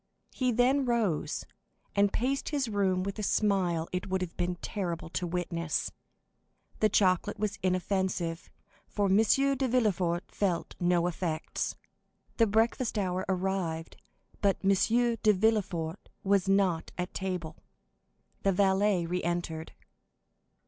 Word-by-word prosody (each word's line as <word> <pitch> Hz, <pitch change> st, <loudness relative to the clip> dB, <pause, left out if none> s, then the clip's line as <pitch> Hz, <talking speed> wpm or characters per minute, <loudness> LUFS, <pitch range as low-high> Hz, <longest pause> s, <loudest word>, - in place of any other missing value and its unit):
He 255 Hz, -1 st, +1 dB
then 255 Hz, +4 st, +3 dB
rose, 225 Hz, -10 st, 0 dB, 0.5 s
and 200 Hz, 0 st, +4 dB
paced 270 Hz, +4 st, -1 dB
his 285 Hz, -4 st, 0 dB
room 195 Hz, -4 st, +1 dB
with 200 Hz, +2 st, -4 dB
a -, -, -1 dB
smile 190 Hz, -6 st, +1 dB
it 180 Hz, +1 st, -3 dB
would 190 Hz, 0 st, 0 dB
have 180 Hz, -2 st, -4 dB
been 180 Hz, 0 st, -1 dB
terrible 175 Hz, -4 st, -4 dB
to 175 Hz, +1 st, -2 dB
witness. 170 Hz, -2 st, -2 dB, 0.9 s
The 215 Hz, -, +4 dB
chocolate 185 Hz, -3 st, +2 dB
was 210 Hz, -1 st, -2 dB
inoffensive, 185 Hz, -2 st, -1 dB, 0.4 s
for 205 Hz, -, -1 dB
M. 190 Hz, -, +5 dB
de 270 Hz, +4 st, +3 dB
Villefort 190 Hz, -8 st, +1 dB
felt 180 Hz, -4 st, -1 dB
no 175 Hz, -1 st, +2 dB
effects. 170 Hz, -2 st, -2 dB, 0.6 s
The 230 Hz, -, +5 dB
breakfast 225 Hz, +2 st, +1 dB
hour 185 Hz, -2 st, -1 dB
arrived, 180 Hz, -4 st, -2 dB, 0.5 s
but 200 Hz, -2 st, +3 dB
M. 195 Hz, -, +4 dB
de 230 Hz, +2 st, +3 dB
Villefort 190 Hz, -5 st, 0 dB
was 195 Hz, -1 st, +2 dB
not 190 Hz, -4 st, +2 dB
at 180 Hz, 0 st, -3 dB
table. 180 Hz, -4 st, -4 dB, 0.8 s
The 195 Hz, -, +3 dB
valet 190 Hz, -1 st, +2 dB
re 180 Hz, +2 st, -2 dB
entered. 170 Hz, -2 st, -3 dB
190 Hz, 130 wpm, -30 LUFS, 175-210 Hz, 0.9 s, M